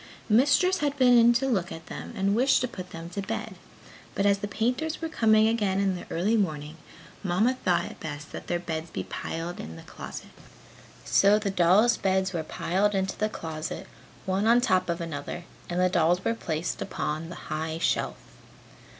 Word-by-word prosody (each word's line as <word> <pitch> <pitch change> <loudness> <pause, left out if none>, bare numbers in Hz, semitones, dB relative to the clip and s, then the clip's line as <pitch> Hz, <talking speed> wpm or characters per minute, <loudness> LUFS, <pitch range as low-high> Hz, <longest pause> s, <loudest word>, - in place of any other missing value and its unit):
Mistress 285 - +4
had 290 -1 -1
been 250 -2 +6
in 235 0 +7
to 250 +3 +1
look 195 -9 0
at 165 - -8
them - - -7
and 195 +1 +2
wished 255 +4 +4
to 255 - 0
put 185 -6 -8
them 165 -1 -8
to 200 - -3
bed, 195 - -4 0.6
but 195 - +1
as 200 -1 +4
the 205 - -3
painters 250 +9 -1
were 325 - -3
coming 220 -7 +4
again 205 -4 +1
in 195 -2 +1
the 180 - -8
early 195 +7 +1
morning, 155 -6 -1 0.5
Mamma 205 +7 +2
thought 175 -2 +2
it - - -9
best 150 -1 -7
that - - -8
their 175 - 0
beds 165 -1 -4
be - - -4
piled 165 +2 -5
in 80 +1 -7
the 80 - -11
closet. - - -9 0.7
So 200 +1 +5
the 210 -2 -1
dolls' 195 +6 +4
beds 190 0 +1
were 165 - -1
piled 195 +6 0
into 190 0 -1
the 215 0 0
closet, 160 -1 -5 0.4
one 195 +3 +1
on 235 +1 +6
top 185 -7 +2
of 170 0 -1
another 165 +1 -5 0.3
and 175 0 -1
the 185 - +4
dolls 175 0 +2
were 230 - +2
placed 165 -6 -3
upon 155 +2 -3
the 175 - -7 0.2
high 160 +1 -2
shelf. - - 0
190 Hz, 195 wpm, -27 LUFS, 170-220 Hz, 0.7 s, in